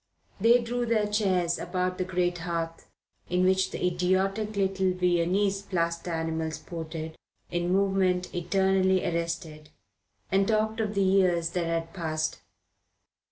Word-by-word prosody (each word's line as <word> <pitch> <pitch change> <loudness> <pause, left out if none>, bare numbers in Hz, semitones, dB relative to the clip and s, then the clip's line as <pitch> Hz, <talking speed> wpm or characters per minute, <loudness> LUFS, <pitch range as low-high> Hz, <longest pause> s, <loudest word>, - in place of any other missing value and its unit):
They 230 +4 +6
drew 240 +1 -2
their 220 -2 +2
chairs 190 -5 +1
about 185 0 -2
the - - +2
great 180 -1 -1
hearth, 165 -1 -4 0.4
in 180 +1 +2
which 190 0 +3
the - - -3
idiotic 190 +4 0
little 190 -1 +1
Viennese 180 +3 +1
plaster 170 -3 -2
animals 160 -1 -2
sported 160 -1 -6 0.4
in 175 0 -1
movement 190 -2 +1
eternally 190 +1 +2
arrested, 165 -2 -3 0.6
and 195 +1 +3
talked 220 0 +1
of 210 -1 -1
the 200 - +3
years 180 -3 +3
that 175 -1 -1
had 165 0 -2
passed. 155 -4 -2
180 Hz, 130 wpm, -27 LUFS, 170-195 Hz, 0.6 s, They